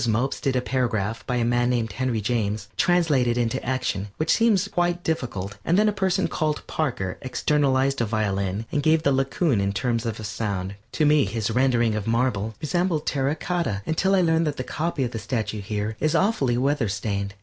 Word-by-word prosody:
Mopes 115 +5 0
did 135 -3 0
a 125 - +2
paragraph 115 -4 -1
by 125 - 0
a 120 -1 +1
man 120 +1 +2
named 115 -3 0
Henry 120 +1 -1
James, 105 -2 -1
translated 150 -9 +2
into 115 -2 -1
action, 120 -6 -1
which 155 +1 +1
seemed 220 -4 +3
quite 175 -1 0
difficult, 100 - -3
and 175 - +2
then 215 +1 +4
a - - +4
person 190 -3 +1
called 155 -2 -2
Parker 115 -12 -2
externalized 135 0 +1
a - - +2
violin 100 -1 -1
and 145 - +1
gave 155 +2 +3
the 140 - +3
Laocoon 135 - +1
in 100 0 0
terms 115 +1 -1
of 115 -1 -3
sound. 100 -3 -3 0.2
To 155 - +2
me 150 -3 +4
his 110 +2 -2
rendering 120 -2 +2
of 105 -1 -3
marble 115 -2 0
resembled 160 +1 0
terra 140 +1 0
cotta 155 - -2
until 190 +5 +2
I 190 - +4
learned 165 -1 +2
that 145 - -2
the 130 - -2
copy 155 +1 -2
of 120 - -2
the 115 - -4
statue 110 -1 -3
here 105 +2 -3
is 155 +2 +1
awfully 160 - +2
weatherstained. 105 -7 -1
125 Hz, 195 wpm, -24 LUFS, 110-155 Hz, 0.2 s, then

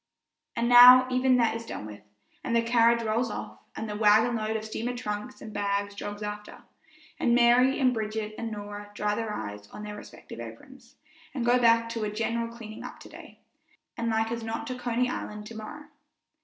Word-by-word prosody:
And 235 -1 0
now 250 +1 +10
even 255 0 +3
that 230 -2 +2
is 230 - -5
done 230 - -7
with, 105 -1 -10 0.4
and 235 - -1
the 230 - +3
carriage 235 0 +3
rolls 225 +2 0
off, - - -7 0.2
and 220 - -5
the 210 - -5
wagon 215 +3 +4
load 220 0 -2
of 215 - -7
steamer 235 +3 -4
trunks 210 +2 -5
and 215 - -9
bags 200 0 -1
jogs 205 +1 -6
after, 210 0 -7 0.6
and 235 - +3
Mary 245 +3 +4
and 255 -2 +3
Bridget 215 -1 -3
and 230 0 -4
Norah 205 0 -7
dry 210 0 0
their 225 0 -3
eyes 105 - -6
on 210 - -9
their 210 0 -6
respective 205 - -11
aprons, 235 - -12 0.4
and 245 -3 -2
go 245 +1 +4
back 230 -1 +4
to 230 -1 -3
a 210 - -1
general 230 +2 -2
cleaning 230 -2 -10
up - - -9
today, - - -13 0.5
and 230 0 -2
like 225 0 0
as 235 0 -3
not 225 +5 -4
to 255 -3 -4
Coney 245 0 -1
Island 210 -4 -5
to 225 - -10
morrow. 220 +8 -8
225 Hz, 195 wpm, -27 LUFS, 210-240 Hz, 0.6 s, now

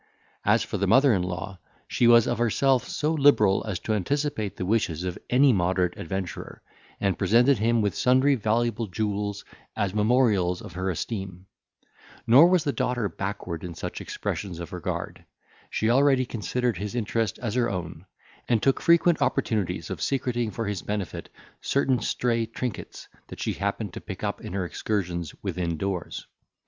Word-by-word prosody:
As - - +3
for - - -4
the - - +1
mother 135 -1 +5
in 95 - +1
law, 90 +1 -5 0.3
she 120 - +2
was 120 -1 +7
of - - -1
herself 125 +2 +2
so 155 +2 0
liberal 140 -10 +4
as 100 -4 -2
to 110 - -1
anticipate 110 -1 -1
the 90 - -3
wishes 90 -5 0
of 90 -1 -3
any 130 +1 +5
moderate 90 -1 +1
adventurer, 90 -1 -6 0.4
and 100 -3 0
presented 120 +6 +4
him 115 0 +2
with 100 - 0
sundry 130 +3 +3
valuable 115 -1 0
jewels, 100 0 -3 0.3
as 100 -3 -1
memorials 105 -5 +2
of - - -10
her 95 +2 -2
esteem; 95 0 -5 0.8
nor 135 +9 +8
was 180 -2 +3
the 145 -3 -1
daughter 125 -4 0
backward 95 -4 -5
in 85 -2 -6
such - - -6
expressions 90 -4 -4
of 85 - -7
regard; - - -5 0.5
she 110 - -1
already 135 0 +4
considered 120 -1 -2
his 105 +4 -5
interest 115 -3 -1
as 115 -4 -4
her 120 -1 +1
own, 90 -2 -6 0.4
and 115 -3 +2
took 135 - +2
frequent 170 0 +4
opportunities 110 -8 -1
of - - -5
secreting 120 -4 -1
for 115 +3 -4
his 100 -3 -3
benefit 105 -3 -4 0.3
certain 135 -2 +1
stray 115 -1 0
trinkets 115 0 -6 0.2
that - - -10
she - - -1
happened - - -3
to - - -7
pick - - -8
up - - -2
in - - -7
her 95 -2 -1
excursions 90 -4 -3
within 85 -2 -2
doors. 95 -1 -4
110 Hz, 165 wpm, -26 LUFS, 95-125 Hz, 0.8 s, nor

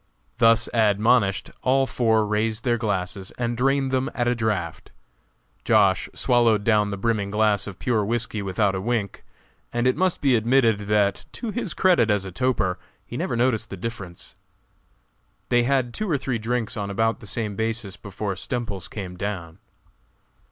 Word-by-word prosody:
Thus 115 0 +5
admonished, 105 -1 +2
all 135 +1 +3
four 110 -4 +2
raised 110 +2 -1
their 120 -2 +1
glasses 95 -3 -2
and 120 -1 -1
drained 135 +2 +1
them 130 0 0
at 120 - 0
a 120 - +3
draft. 105 -8 -2 0.7
Josh. - - +3
swallowed 115 -4 +3
down 105 -2 +3
the 100 - -4
brimming 105 -1 0
glass 105 -1 +1
of 95 -3 -8
pure 115 -4 0
whisky 115 0 -1
without 100 +1 0
a 95 - -3
wink, 110 -2 -2 0.5
and 120 +1 -1
it 130 - +3
must 185 +3 +1
be 135 -4 +3
admitted 115 -3 +2
that, 105 -1 +1
to 230 -3 -4
his 215 -7 -3
credit 175 -12 +3
as 105 -2 +1
a 95 - -6
toper, 95 -4 0 0.3
he - - -9
never - - -2
noticed 120 -2 +1
the 95 - -7
difference. 95 -4 -7 1.2
They 120 -1 +3
had 130 -2 +1
two 215 -2 -3
or 150 - +2
three 125 -3 -2
drinks 115 +1 -1
on 100 -2 -3
about 115 +3 0
the 105 - -10
same 105 -1 -3
basis 110 -2 -3
before 105 0 -5
Stemples 100 -4 -4
came 95 -4 -7
down. 90 -5 -5
110 Hz, 165 wpm, -24 LUFS, 100-120 Hz, 1.2 s, Thus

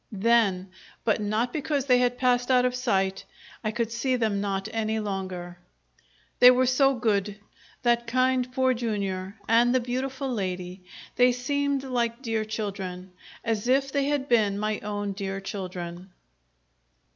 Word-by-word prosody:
Then, 195 -3 +2 0.3
but 220 -1 +1
not 215 +4 -1
because 285 -2 -1
they 250 -2 +4
had 245 0 +1
passed 245 -1 +2
out 250 -1 +4
of 250 - +1
sight, 195 -6 0 0.4
I 215 - 0
could 230 +1 -2
see 255 +3 0
them 215 -4 0
not 195 0 -2
any 220 -1 -1
longer. 185 -4 -5 0.8
They 250 - +10
were 255 +1 +4
so 270 +2 +3
good 210 -4 0 0.5
that 235 -1 +2
kind 255 +1 +1
Poor 260 0 +2
Jr. 200 -5 -3
and 240 +2 +4
the - - +4
beautiful 260 +2 -3
lady; 185 -4 -4 0.3
they 250 0 +6
seemed 280 +2 -1
like 240 -1 -2
dear 225 -3 -1
children 195 -4 -5 0.3
as 225 -1 -1
if 270 +2 +2
they 280 -1 +1
had 285 -1 -1
been 215 -5 +3
my 215 0 -1
own 205 -1 -3
dear 195 -1 -4
children. 185 -2 -6
230 Hz, 150 wpm, -26 LUFS, 200-250 Hz, 0.8 s, They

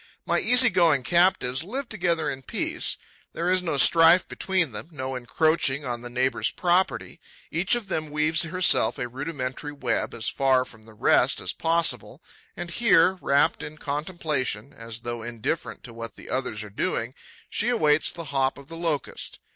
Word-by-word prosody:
My - - +2
easy 250 0 +5
going 165 -7 +3
captives 170 -6 +2
live 255 +8 -4
together 170 -7 -1
in 135 - -4
peace. - - -2 0.4
There 175 +2 -1
is 185 0 +3
no 165 -5 -2
strife 165 +5 +6
between 185 -7 -1
them, 105 +5 -7
no 135 -4 -5
encroaching 140 +2 +1
on 120 -2 -4
the 120 - -8
neighbour's 130 +2 0
property. 180 +1 0 0.3
Each 180 +7 +2
of 235 -4 -4
them 155 -4 -3
weaves 155 +2 +1
herself 165 -9 +2
a 125 - -3
rudimentary 135 +1 -5
web, 145 - -2
as 110 - +1
far 130 -1 +2
from 110 -3 -15
the 110 -1 -16
rest - - +3
as - - -2
possible, 165 -8 0 0.3
and 175 - -6
here, 190 -4 +3
rapt 140 +1 +2
in 150 +1 -8
contemplation, 145 - -3
as 115 0 -8
though 120 -1 -5
indifferent 120 +7 -4
to 120 - -10
what 115 0 -8
the - - -11
others 125 -5 -2
are 105 - -11
doing, 120 - -2 0.3
she 230 - 0
awaits 155 -11 +3
the 170 - -6
hop 135 -1 +1
of 140 +1 -14
the 165 - -8
Locust. 165 -5 -3
150 Hz, 170 wpm, -25 LUFS, 125-170 Hz, 0.4 s, strife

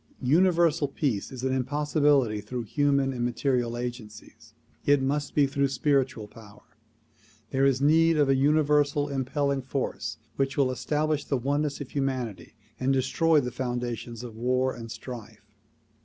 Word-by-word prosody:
Universal 165 +1 +3
Peace 135 -6 -2
is 130 -1 -7
an 130 0 0
impossibility 140 -3 +1
through 120 +4 -5
human 140 +3 +1
and 120 -1 -3
material 120 -1 0
agencies; 120 -3 -8 0.3
it 145 0 +4
must 145 +2 -2
be 145 - +5
through 140 0 0
spiritual 135 -4 0
power. 105 -1 -15 0.9
There 135 +1 +2
is 135 -1 +1
need 165 +2 +4
of 145 -2 +3
a 135 - +4
universal 145 0 +2
impelling 140 +1 -1
force 130 +1 -3 0.2
which 135 +1 -1
will 135 -2 +3
establish 150 +4 -1
the 140 - 0
oneness 145 +3 -1
of 135 - -7
humanity 130 -8 -3 0.2
and 130 +1 +1
destroy 145 +4 +2
the 125 -1 -4
foundations 120 -1 -4
of 115 -3 -8
war 125 +3 0
and 115 -1 -9
strife. 110 -4 -10
135 Hz, 145 wpm, -27 LUFS, 120-145 Hz, 0.9 s, be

